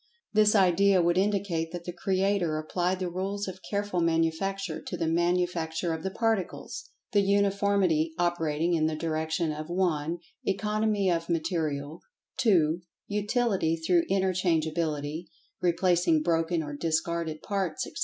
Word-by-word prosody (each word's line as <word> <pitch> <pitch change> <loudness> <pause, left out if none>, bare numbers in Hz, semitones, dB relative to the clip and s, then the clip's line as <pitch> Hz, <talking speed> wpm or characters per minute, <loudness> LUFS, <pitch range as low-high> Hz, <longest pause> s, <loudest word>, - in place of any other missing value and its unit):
This 215 0 +4
idea 195 0 +4
would 175 +1 +3
indicate 190 -5 0
that 175 -1 -6
the 175 - -5
Creator 190 -2 0
applied 175 +4 -1
the 185 0 -2
rules 195 +3 -3
of 185 0 -6
careful 205 -3 -1
manufacture 165 +2 0
to 180 - -5
the 165 - -1
manufacture 170 0 0
of 160 - -4
the 190 - -2
Particles, 220 -1 -2 0.2
the 205 - +4
uniformity 200 -5 +2
operating 170 -1 0
in 155 -2 +2
the 160 - -2
direction 160 +1 -1
of 155 +1 -6
(1) 170 -3 0 0.3
Economy 210 0 +1
of 165 0 -1
Material; 155 -3 -2 0.4
(2) 175 -10 +3 0.3
Utility 210 -5 +1
through 170 +1 +2
interchangeability, 165 -4 0 0.4
replacing 175 -2 +2
broken 165 0 +1
or 145 -1 -6
discarded 160 0 -2
parts, 190 -6 -2
etc. - - -10
175 Hz, 135 wpm, -28 LUFS, 160-195 Hz, 0.4 s, This